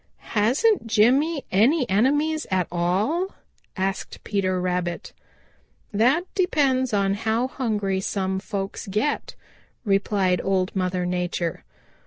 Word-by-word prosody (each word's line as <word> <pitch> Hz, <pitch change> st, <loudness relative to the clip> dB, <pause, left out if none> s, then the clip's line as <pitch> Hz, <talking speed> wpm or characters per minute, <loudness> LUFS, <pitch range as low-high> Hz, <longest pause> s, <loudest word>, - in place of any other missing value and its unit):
"Hasn't 245 Hz, -, +2 dB
Jimmy 265 Hz, +8 st, +3 dB
any 250 Hz, -, +3 dB
enemies 290 Hz, +9 st, +1 dB
at 185 Hz, -2 st, +1 dB
all?" 200 Hz, -, 0 dB, 0.4 s
asked 190 Hz, +1 st, -3 dB
Peter 185 Hz, -3 st, 0 dB
Rabbit. 180 Hz, -1 st, -2 dB, 0.8 s
"That 250 Hz, +11 st, +3 dB
depends 275 Hz, -9 st, +1 dB
on 200 Hz, -2 st, +2 dB
how 225 Hz, +4 st, 0 dB
hungry 210 Hz, -7 st, -1 dB
some 190 Hz, -1 st, -1 dB
folks 195 Hz, 0 st, -5 dB
get," 215 Hz, +10 st, -1 dB, 0.5 s
replied 195 Hz, -3 st, +1 dB
Old 190 Hz, -1 st, 0 dB
Mother 185 Hz, -1 st, -1 dB
Nature. 180 Hz, -2 st, -2 dB
205 Hz, 105 wpm, -24 LUFS, 185-260 Hz, 0.8 s, Jimmy